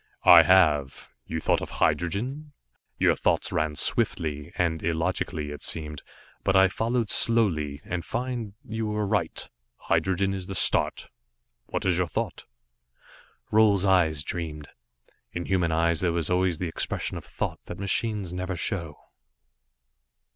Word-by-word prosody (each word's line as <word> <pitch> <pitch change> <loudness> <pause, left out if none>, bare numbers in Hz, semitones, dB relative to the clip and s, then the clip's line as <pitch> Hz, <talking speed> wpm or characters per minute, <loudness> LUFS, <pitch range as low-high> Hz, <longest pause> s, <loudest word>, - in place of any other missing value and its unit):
"I - - +10
have. 80 -6 +3 0.2
You 80 - -3
thought - - +1
of - - -5
hydrogen? 130 - -1 0.4
Your - - +3
thoughts - - 0
ran 75 0 -1
swiftly, 75 -1 -1
and 80 -2 0
illogically, 80 -2 -2
it 75 - -8
seemed, 75 -2 -3 0.4
but 95 - +1
I 95 0 +6
followed 115 +3 -1
slowly, 80 -12 +2
and 85 -1 -3
find 120 -1 -4
you 110 0 -3
were 105 0 -1
right. 100 -5 -1 0.3
Hydrogen 95 +1 0
is 95 -2 -6
the 95 - -5
start. - - +3 0.6
What - - -3
is 90 -2 +2
your 90 - +1
thought?" - - -4 1.1
Roal's 105 -3 +4
eyes 85 -6 +3
dreamed. 80 -4 -5 0.6
In 85 -1 -4
human 90 -3 +1
eyes 80 0 +2
there 90 -2 +1
was 85 0 -1
always 90 -2 +1
the 90 - -3
expression 80 - -3
of - - -6
thought - - -4
that - - -7
machines 100 -1 -2
never 90 +1 -3
show. 85 -4 -3
90 Hz, 140 wpm, -26 LUFS, 80-100 Hz, 1.1 s, I